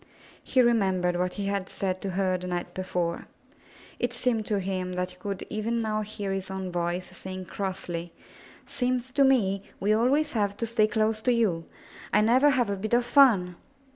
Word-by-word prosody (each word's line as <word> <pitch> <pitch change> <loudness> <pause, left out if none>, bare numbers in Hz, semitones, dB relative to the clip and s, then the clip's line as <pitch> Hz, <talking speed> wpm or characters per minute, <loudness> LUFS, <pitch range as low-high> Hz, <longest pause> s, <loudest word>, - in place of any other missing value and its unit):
He 255 -1 +3
remembered 190 -7 +2
what 180 +1 -1
he 200 - -3
had 200 -1 -2
said 185 -1 -3
to 195 - -3
her 185 0 0
the 180 0 -5
night 175 -1 -3
be 185 - -4
fore. 175 -2 -2 0.7
It 245 0 -1
seemed 230 -4 0
to 210 - +1
him 185 -1 -3
that 180 0 -2
he 180 - -16
could 200 -1 -5
even 225 +2 -2
now 215 -1 -1
hear 205 -2 -4
his 195 -1 -4
own 190 -1 -4
voice 175 +1 -2
saying 185 0 -7
crossly, 175 -3 -4 0.5
''Seems 255 0 -1
to 275 +1 +3
me 205 -8 +3 0.2
we 205 +2 +2
always 275 +7 +2
have 205 -3 0
to 230 - -1
stay 225 -2 +2
close 215 0 0
to 250 - +2
you. 200 -9 +1 0.5
I 210 - +4
never 250 +7 +5
have 245 -6 +2
a - - 0
bit 215 +4 0
of 240 0 +2
fun!" 230 -10 +5
200 Hz, 195 wpm, -27 LUFS, 185-235 Hz, 0.7 s, never